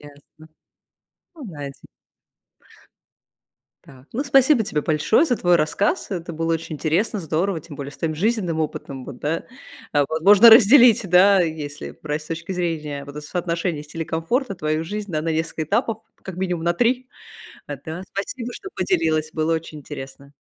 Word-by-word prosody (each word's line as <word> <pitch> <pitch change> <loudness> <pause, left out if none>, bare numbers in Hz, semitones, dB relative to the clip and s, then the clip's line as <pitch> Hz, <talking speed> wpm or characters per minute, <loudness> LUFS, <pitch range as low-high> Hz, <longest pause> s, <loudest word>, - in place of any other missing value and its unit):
Ясно, 145 +2 -16 0.9
ну 290 -6 -9
да, 145 -4 -8
эти. 140 - -11 2.0
Да, 130 -1 -16
ну 270 +6 -2
спасибо 270 -3 +4
тебе 155 -8 -1
большое 155 - +3
за 250 -6 0
твой 175 -3 +3
рассказ. 170 +7 0
Это 170 -2 -4
было 165 +1 -1
очень 160 0 -5
интересно, 175 +8 0
здорово, 165 +2 -1
тем 150 -2 -12
более 140 0 -6
с - - -14
твоим 160 -1 -2
жизненным 185 -3 0
опытом, 140 -3 -5
вот, 125 -2 -9
да. 160 +3 -2 0.5
А 145 -1 +3
возможно 200 +8 +7
разделить, 235 -2 +7
да, 190 +2 +6
если 155 -4 -4
брать 150 0 -3
с 150 - -14
точки 165 +3 -5
зрения, 155 -5 -3
вот, 145 +1 -8
соотношения 170 0 -2
стиля 165 +2 -6
и - - -5
комфорта, 195 - -1
твою 155 -2 -1
жизнь, 205 +2 -5
да, 155 - 0
на 165 - -1
несколько 160 0 -2
этапов, 215 +8 0 0.2
как 190 -2 -8
минимум 180 -3 -2
на 170 - +3
3, 250 +4 +1 0.6
э, 145 - -4
да. 160 +3 -6
Спасибо, 235 +5 -4
что 385 -1 -9
поделилась, 155 - 0
было 160 +1 0
очень 160 -1 -5
интересно. 140 0 -10
165 Hz, 165 wpm, -22 LUFS, 155-200 Hz, 2.0 s, возможно